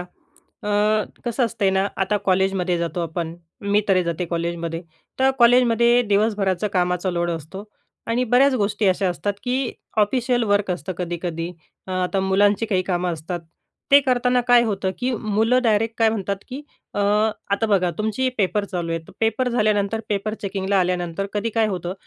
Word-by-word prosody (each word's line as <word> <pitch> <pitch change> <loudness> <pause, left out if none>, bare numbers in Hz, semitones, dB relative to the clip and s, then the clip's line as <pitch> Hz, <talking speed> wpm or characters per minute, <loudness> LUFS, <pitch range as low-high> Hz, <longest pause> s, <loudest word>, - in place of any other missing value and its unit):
अ, 180 +3 -11 0.5
कसं 240 +1 0
असतंय 200 -3 0
ना? 190 +1 +1
आता 195 +2 +1
कॉलेजमध्ये 185 -1 +2
जातो 170 +1 -2
आपण, 165 0 -4 0.3
मी 200 +1 +2
तरी 185 -2 +4
जाते 170 +1 -2
कॉलेजमध्ये. 170 0 -3 0.4
तर 265 0 +4
कॉलेजमध्ये 240 0 +5
दिवस 210 +2 +2
भराचं 190 -1 0
कामाचा 180 0 0
लोड 175 -1 -1
असतो 165 +5 -6 0.4
आणि 240 +2 +1
बऱ्याच 260 +3 +4
गोष्टी 205 -2 0
अशा 190 +1 +1
असतात 200 +3 -2
की 255 0 -1 0.3
ऑफिशियल 240 +3 +2
वर्क 205 -2 +1
असतं 180 +1 -3
कधी-कधी. 170 -1 -3 0.4
अ, - - -8
आता 185 +1 0
मुलांची 200 +3 +2
काही 190 -4 +1
कामं 180 -1 -1
असतात, 170 +2 -5 0.5
ते 280 +1 +8
करताना 250 0 +2
काय 245 -1 +7
होतं 200 -4 -1
की 250 +1 -1
मुलं 220 +4 +2
डायरेक्ट 225 0 +1
काय 225 - +4
म्हणतात 200 -2 -2
की 265 +3 -6 0.3
अ, - - -1 0.5
आता 215 +3 +1
बघा 185 -3 +2
तुमची 220 +4 0
पेपर 205 +1 +1
चालू 175 -4 -4
आहे, 165 - -1 0.2
पेपर 225 +3 +1
झाल्यानंतर 215 -2 +1
पेपर 210 +1 -1
चेकिंगला 195 0 0
आल्यानंतर 180 +1 -1
कधी 210 +2 -1
काय 225 -1 +3
होतं 180 -2 -3
200 Hz, 165 wpm, -22 LUFS, 180-225 Hz, 0.5 s, ते